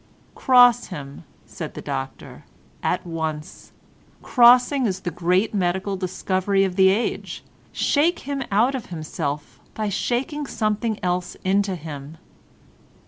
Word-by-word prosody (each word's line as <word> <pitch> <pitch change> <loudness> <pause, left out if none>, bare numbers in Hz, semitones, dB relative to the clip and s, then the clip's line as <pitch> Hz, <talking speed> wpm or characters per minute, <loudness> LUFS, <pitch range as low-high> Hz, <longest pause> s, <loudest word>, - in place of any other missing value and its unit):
"Cross 245 -2 +5
him," 140 -7 -9 0.2
said - - -8
the - - -6
doctor, 65 - -6 0.4
"at 180 +1 -1
once. 160 -2 -5 0.5
Crossing 250 +1 +5
is 190 -1 -3
the 175 - -3
great 180 +6 +1
medical 190 +1 -1
discovery 190 +1 0
of 190 -2 -1
the 190 0 +6
age. 210 +5 -2 0.3
Shake 320 +5 +1
him 280 0 -4
out 230 +7 +3
of 260 -3 -5
himself 155 -3 -5 0.2
by 215 -1 -2
shaking 275 - -2
something 215 -1 -1
else 180 0 -1
into 195 0 +1
him." 150 -2 -8
195 Hz, 125 wpm, -23 LUFS, 175-240 Hz, 0.5 s, the